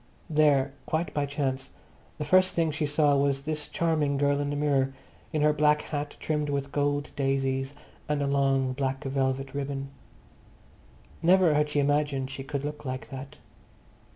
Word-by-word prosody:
There, 145 Hz, -3 st, +3 dB
quite 160 Hz, +2 st, -1 dB
by 145 Hz, -1 st, 0 dB
chance, 135 Hz, -2 st, -2 dB, 0.5 s
the 150 Hz, -, -3 dB
first 185 Hz, +4 st, +4 dB
thing 165 Hz, -2 st, +2 dB
she 150 Hz, 0 st, -1 dB
saw 145 Hz, 0 st, +3 dB
was 140 Hz, -1 st, +1 dB
this 155 Hz, 0 st, -3 dB
charming 155 Hz, -4 st, +1 dB
girl 140 Hz, 0 st, +2 dB
in 145 Hz, 0 st, -1 dB
the 145 Hz, -, -2 dB
mirror, 135 Hz, -2 st, +1 dB, 0.4 s
in 155 Hz, -1 st, 0 dB
her 150 Hz, 0 st, +5 dB
black 150 Hz, 0 st, +3 dB
hat 145 Hz, -1 st, -4 dB
trimmed 150 Hz, -1 st, -1 dB
with 140 Hz, -1 st, -2 dB
gold 145 Hz, 0 st, 0 dB
daisies, 135 Hz, 0 st, 0 dB, 0.3 s
and 150 Hz, -1 st, +1 dB
a 140 Hz, -, 0 dB
long 135 Hz, -2 st, +2 dB
black 135 Hz, +1 st, -2 dB
velvet 135 Hz, 0 st, -1 dB
ribbon. 140 Hz, -1 st, -3 dB, 1.3 s
Never 175 Hz, -1 st, +5 dB
had 150 Hz, 0 st, +2 dB
she 150 Hz, -, +1 dB
imagined 140 Hz, -2 st, +1 dB
she 135 Hz, 0 st, -6 dB
could 140 Hz, 0 st, -4 dB
look 150 Hz, 0 st, -5 dB
like 130 Hz, -1 st, -5 dB
that. 135 Hz, 0 st, -8 dB
145 Hz, 165 wpm, -28 LUFS, 135-150 Hz, 1.3 s, her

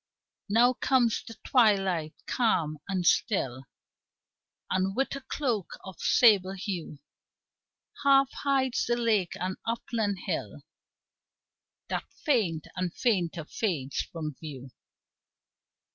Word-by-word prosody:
Now 240 Hz, +4 st, +5 dB
comes 250 Hz, -3 st, +2 dB
the 225 Hz, -, -8 dB
twilight, 195 Hz, -, +2 dB
calm 160 Hz, -, +1 dB
and 185 Hz, -3 st, -1 dB
still, 135 Hz, -, +1 dB, 1.1 s
And, 190 Hz, +1 st, 0 dB
with 270 Hz, +1 st, 0 dB
a 275 Hz, -, -6 dB
cloak 245 Hz, -, -2 dB
of 190 Hz, -3 st, -10 dB
sable 200 Hz, -6 st, +5 dB
hue, 185 Hz, -5 st, -5 dB, 1.1 s
Half 275 Hz, -1 st, +5 dB
hides 270 Hz, -3 st, 0 dB
the 240 Hz, 0 st, +1 dB
lake 215 Hz, -7 st, +1 dB
and 185 Hz, +1 st, -3 dB
upland 225 Hz, -3 st, -1 dB
hill -, -, -4 dB, 1.3 s
That -, -, -3 dB
faint 200 Hz, -, +1 dB
and 180 Hz, -1 st, -2 dB
fainter 175 Hz, -8 st, 0 dB
fades 155 Hz, -, -2 dB
from 155 Hz, -3 st, -4 dB
view. 135 Hz, -5 st, -8 dB
195 Hz, 105 wpm, -28 LUFS, 170-240 Hz, 1.3 s, Now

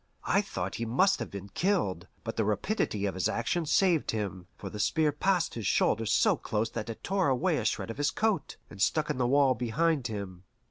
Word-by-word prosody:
I -, -, +3 dB
thought -, -, -4 dB
he -, -, 0 dB
must 185 Hz, -, +3 dB
have -, -, -4 dB
been 100 Hz, 0 st, -8 dB
killed, 100 Hz, -, 0 dB, 0.2 s
but 115 Hz, +1 st, -4 dB
the 110 Hz, -, +1 dB
rapidity 105 Hz, -, -1 dB
of 100 Hz, -, -1 dB
his 95 Hz, 0 st, 0 dB
action 160 Hz, +8 st, -1 dB
saved 170 Hz, 0 st, +3 dB
him, 95 Hz, -5 st, -3 dB
for -, -, -7 dB
the 105 Hz, -, -7 dB
spear 155 Hz, +8 st, +2 dB
passed 180 Hz, +3 st, +1 dB
his 110 Hz, -4 st, -3 dB
shoulder 110 Hz, +3 st, +2 dB
so 105 Hz, -, +4 dB
close 110 Hz, +2 st, -2 dB
that 115 Hz, -1 st, -5 dB
it 115 Hz, -, -7 dB
tore 190 Hz, -2 st, +1 dB
away 130 Hz, -2 st, +1 dB
a -, -, -2 dB
shred -, -, -1 dB
of 115 Hz, -, -9 dB
his 145 Hz, 0 st, +2 dB
coat, 215 Hz, +2 st, -1 dB
and 100 Hz, -, -9 dB
stuck 150 Hz, +6 st, +2 dB
in -, -, -4 dB
the 125 Hz, -, +2 dB
wall 135 Hz, 0 st, +4 dB
behind 130 Hz, +4 st, 0 dB
him. 100 Hz, -5 st, -6 dB
120 Hz, 220 wpm, -29 LUFS, 105-160 Hz, 0.2 s, so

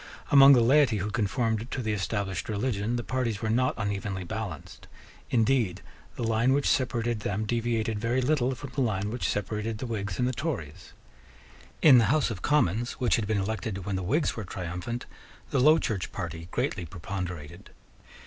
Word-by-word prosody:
Among 140 Hz, 0 st, +9 dB
the 125 Hz, -, +5 dB
laity 130 Hz, -2 st, +4 dB
who 105 Hz, +2 st, -3 dB
conformed 115 Hz, +1 st, -1 dB
to 125 Hz, -, -3 dB
the 110 Hz, -1 st, -1 dB
established 100 Hz, -2 st, -2 dB
religion 110 Hz, +1 st, -1 dB
the 120 Hz, -, -2 dB
parties 120 Hz, -4 st, -2 dB
were 110 Hz, -, 0 dB
not 130 Hz, +3 st, +2 dB
unevenly 100 Hz, -3 st, -3 dB
balanced. 100 Hz, -5 st, -6 dB, 0.4 s
Indeed 115 Hz, -6 st, +1 dB, 0.3 s
the -, -, -4 dB
line 115 Hz, +3 st, +2 dB
which 140 Hz, 0 st, +1 dB
separated 120 Hz, -3 st, 0 dB
them 105 Hz, 0 st, -2 dB
deviated 115 Hz, -1 st, -1 dB
very 120 Hz, +3 st, 0 dB
little 130 Hz, -1 st, +1 dB
from 135 Hz, +1 st, -9 dB
the 140 Hz, -, -2 dB
line 105 Hz, -4 st, 0 dB
which 120 Hz, -, -2 dB
separated 105 Hz, +2 st, -2 dB
the 130 Hz, -, -5 dB
Whigs 105 Hz, -5 st, -3 dB
and 125 Hz, -, +1 dB
the 130 Hz, -, -1 dB
Tories. 110 Hz, -, -5 dB, 0.9 s
In 135 Hz, -6 st, +9 dB
the 115 Hz, -, +4 dB
House 140 Hz, +3 st, +2 dB
of 95 Hz, -5 st, -6 dB
Commons, 120 Hz, -5 st, +1 dB
which 120 Hz, -7 st, +1 dB
had 110 Hz, -3 st, -2 dB
been 110 Hz, -1 st, +1 dB
elected 100 Hz, -1 st, -3 dB
when 100 Hz, -, -2 dB
the 95 Hz, -, -2 dB
Whigs 140 Hz, -, 0 dB
were 110 Hz, -, -4 dB
triumphant, 90 Hz, +6 st, -5 dB, 0.5 s
the 140 Hz, -, +2 dB
Low 155 Hz, +5 st, +6 dB
Church 105 Hz, -, -2 dB
party 85 Hz, -1 st, -6 dB
greatly 120 Hz, -4 st, -2 dB
preponderated. 85 Hz, -3 st, -6 dB
110 Hz, 175 wpm, -28 LUFS, 100-125 Hz, 0.9 s, Among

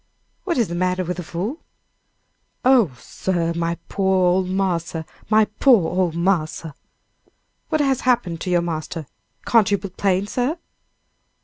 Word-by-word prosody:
"What 345 Hz, -6 st, 0 dB
is 235 Hz, -4 st, +2 dB
the 170 Hz, -, -5 dB
matter 185 Hz, +1 st, 0 dB
with 180 Hz, 0 st, -3 dB
the 180 Hz, -, -4 dB
fool?" 195 Hz, -, -4 dB, 1.0 s
"Oh, 235 Hz, -, +4 dB
sir; 170 Hz, -3 st, -2 dB
my 170 Hz, 0 st, -1 dB
poor 190 Hz, -2 st, +2 dB
ole 185 Hz, +1 st, +2 dB
marse! 180 Hz, -3 st, -1 dB, 0.3 s
my 215 Hz, 0 st, +5 dB
poor 235 Hz, -12 st, +5 dB
ole 180 Hz, -1 st, +1 dB
marse!" 170 Hz, -2 st, 0 dB, 1.0 s
"What 310 Hz, -2 st, +1 dB
has 270 Hz, -3 st, +1 dB
happened 235 Hz, -10 st, +1 dB
to -, -, -3 dB
your 175 Hz, -1 st, +2 dB
master? 160 Hz, -1 st, -4 dB, 0.4 s
Can't 225 Hz, -3 st, +4 dB
you 200 Hz, -, +3 dB
be 195 Hz, +1 st, -7 dB
plain, 190 Hz, +1 st, 0 dB
sir?" 250 Hz, +9 st, -1 dB
185 Hz, 145 wpm, -22 LUFS, 170-220 Hz, 1.0 s, my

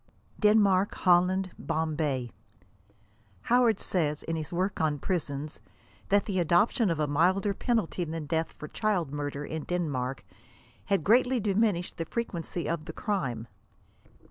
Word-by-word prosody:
DENMARK. 205 Hz, -2 st, +4 dB
HOLLAND. 185 Hz, +1 st, +3 dB
BOMBAY. 150 Hz, -6 st, -1 dB, 1.1 s
Howard 240 Hz, -4 st, +3 dB
says, 155 Hz, -5 st, -1 dB
in 165 Hz, -, -3 dB
his 155 Hz, -3 st, -4 dB
work 185 Hz, +2 st, -1 dB
on 155 Hz, -2 st, +1 dB
prisons, 150 Hz, -3 st, -3 dB, 0.5 s
that 200 Hz, 0 st, +3 dB
the 190 Hz, -3 st, -1 dB
adoption 180 Hz, -, +3 dB
of 165 Hz, -2 st, -1 dB
a 150 Hz, -, +2 dB
milder 185 Hz, +8 st, +2 dB
penalty 215 Hz, -5 st, -1 dB
than 160 Hz, -1 st, -4 dB
death 160 Hz, +2 st, -1 dB
for 150 Hz, -, -7 dB
child 180 Hz, -10 st, -1 dB
murder, 145 Hz, 0 st, -3 dB
in 160 Hz, 0 st, -4 dB
Denmark, 140 Hz, -8 st, -2 dB, 0.3 s
«* -, -, -29 dB
had 195 Hz, -5 st, +1 dB
greatly 245 Hz, -, +4 dB
diminished 200 Hz, -3 st, 0 dB
the 165 Hz, -, -3 dB
frequency 175 Hz, -4 st, -4 dB
of 165 Hz, -2 st, -2 dB
the -, -, -7 dB
crime." 135 Hz, -, -2 dB
175 Hz, 140 wpm, -28 LUFS, 150-200 Hz, 1.1 s, DENMARK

